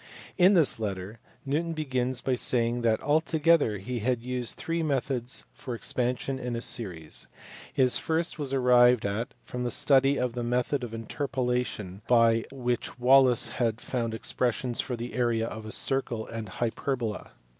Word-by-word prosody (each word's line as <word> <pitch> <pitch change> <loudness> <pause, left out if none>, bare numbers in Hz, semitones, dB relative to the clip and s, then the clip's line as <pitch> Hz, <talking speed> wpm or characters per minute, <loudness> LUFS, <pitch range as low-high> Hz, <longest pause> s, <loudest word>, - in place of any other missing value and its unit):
In 190 +2 +5
this 160 -9 +4
letter, 100 0 -4 0.3
Newton 160 +5 -1
begins 130 -5 -2
by 130 - 0
saying 120 -1 +1
that 115 -2 +2
altogether 155 -5 +3
he 120 +6 -4
had 120 +1 -1
used 125 -1 -2
three 165 0 -2
methods 135 -4 -2
for 125 -3 -6
expansion 125 +3 -2
in 120 -2 -3
series. 90 -10 -3 0.4
His 130 -2 +3
first 165 +1 -1
was 140 -3 -3
arrived 125 -3 +5
at 100 +4 -3
from 125 0 -4
the 120 - -1
study 135 +2 +4
of 125 -2 -1
the 120 - -3
method 125 +3 0
of 115 -2 -5
interpolation 125 -5 -3
by 115 -2 +4
which 125 -3 -3
Wallis 130 -1 +5
had 115 -2 -1
found 115 -3 -2
expressions 120 +1 -1
for 125 - -4
the 120 +1 -6
area 120 -2 +1
of 110 -1 -7
a - - -6
circle 120 -4 0
and 115 -1 -6
a - - -11
hyperbola. 120 -2 -3
125 Hz, 155 wpm, -28 LUFS, 115-135 Hz, 0.4 s, In